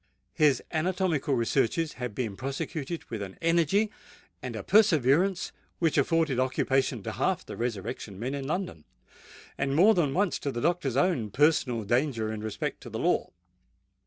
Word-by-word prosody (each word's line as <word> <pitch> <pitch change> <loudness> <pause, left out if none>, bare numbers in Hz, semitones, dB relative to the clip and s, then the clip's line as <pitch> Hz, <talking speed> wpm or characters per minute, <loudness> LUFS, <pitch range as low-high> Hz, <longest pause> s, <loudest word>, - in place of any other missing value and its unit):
His 150 -6 +3
anatomical 170 -4 0
researches 135 +6 +1
had 125 -4 -5
been 115 -6 -3
prosecuted 140 - -4
with 110 -3 -4
an 95 -1 -7
energy 170 +6 +2 0.5
and - - -5
a - - -5
perseverance 180 - +3 0.3
which 165 -3 +1
afforded 150 -2 +2
occupation 130 -2 0
to - - -4
half - - -1
the - - -7
resurrection 105 -3 -4
men 125 +6 -3
in 140 -1 -4
London, 155 - -3 0.8
and 135 0 0
more 195 +8 +6
than 150 -8 +1
once 200 -2 +1
to 140 - -2
the 120 - -4
doctor's 150 -4 0
own 140 - +1
personal 130 -2 +2
danger 115 -1 0
in 105 - -5
respect 110 -1 -4
to - - -9
the - - -5
law. - - +1
140 Hz, 160 wpm, -28 LUFS, 120-165 Hz, 0.8 s, more